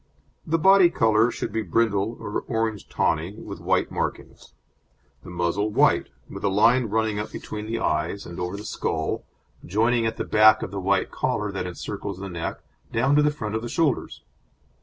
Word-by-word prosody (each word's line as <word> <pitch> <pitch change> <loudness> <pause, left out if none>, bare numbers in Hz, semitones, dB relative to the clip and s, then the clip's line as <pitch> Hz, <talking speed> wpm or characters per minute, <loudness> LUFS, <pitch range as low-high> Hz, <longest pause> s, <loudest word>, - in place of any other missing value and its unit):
The 165 +1 +2
body 190 +1 +6
colour 110 -5 +3
should - - -4
be 110 - 0
brindle 105 +2 0
or 105 - -3
orange 110 -3 -2
tawny, 85 +5 0
with - - -8
white - - 0
markings; - - -5 0.7
the - - -10
muzzle 90 +4 -1
white, 105 - +3 0.2
with - - -9
a 100 - +2
line 115 +6 +4
running 110 -1 0
up 105 - -5
between 105 0 -6
the 115 +1 -2
eyes, 85 0 -1
and 85 +1 -8
over 90 +2 -3
the 105 - -8
skull, - - -2 0.4
joining 115 +4 +1
at 110 - -3
the - - -3
back 110 0 +6
the 100 +1 -4
white 95 +1 +1
collar 105 -6 -1
that 95 -2 -3
encircles 100 +2 -5
the 100 +1 -6
neck 85 -2 -5 0.3
down 130 +5 +2
to 150 - +5
the 150 - +4
front 110 -8 -5
of 110 - -1
the 120 - -5
shoulders. 155 -3 -1
110 Hz, 180 wpm, -24 LUFS, 100-115 Hz, 0.7 s, body